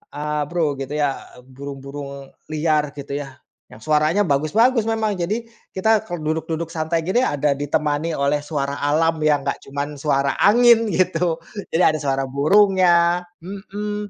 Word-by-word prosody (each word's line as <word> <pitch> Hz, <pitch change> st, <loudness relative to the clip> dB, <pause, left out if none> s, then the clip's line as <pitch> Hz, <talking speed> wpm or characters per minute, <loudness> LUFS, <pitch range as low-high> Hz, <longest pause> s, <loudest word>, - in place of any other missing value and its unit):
eee, 150 Hz, 0 st, -2 dB
Bro," 160 Hz, -5 st, 0 dB
gitu 135 Hz, -, -6 dB
ya, 145 Hz, -2 st, -1 dB, 0.2 s
"burung-burung 140 Hz, +1 st, -8 dB, 0.2 s
liar," 155 Hz, -1 st, +1 dB
gitu 140 Hz, 0 st, -7 dB
ya, 140 Hz, -2 st, -8 dB, 0.3 s
"yang -, -, -13 dB
suaranya 155 Hz, -, +2 dB
bagus-bagus, 210 Hz, -, +2 dB
memang. 220 Hz, -2 st, 0 dB
Jadi, 210 Hz, +7 st, -2 dB, 0.3 s
kita, 220 Hz, +3 st, +3 dB
kalau 175 Hz, -2 st, -5 dB
duduk-duduk 160 Hz, 0 st, -4 dB
santai 160 Hz, +1 st, -1 dB
gini, 215 Hz, +7 st, +2 dB
ada 145 Hz, -, +1 dB
ditemani 145 Hz, +2 st, -1 dB
oleh 140 Hz, +1 st, +1 dB
suara 140 Hz, -2 st, -3 dB
alam, 160 Hz, +2 st, +1 dB
yang 150 Hz, -2 st, +2 dB
nggak 140 Hz, -, -2 dB
cuman 145 Hz, +1 st, -4 dB
suara 140 Hz, -2 st, +1 dB
angin," 230 Hz, +1 st, +5 dB
gitu. 175 Hz, -3 st, +1 dB, 0.4 s
Jadi 170 Hz, -, +3 dB
ada 155 Hz, -, -3 dB
suara 135 Hz, -2 st, 0 dB
burungnya 175 Hz, +3 st, +4 dB, 0.2 s
mhm, 205 Hz, +2 st, -6 dB
155 Hz, 145 wpm, -21 LUFS, 145-185 Hz, 0.4 s, angin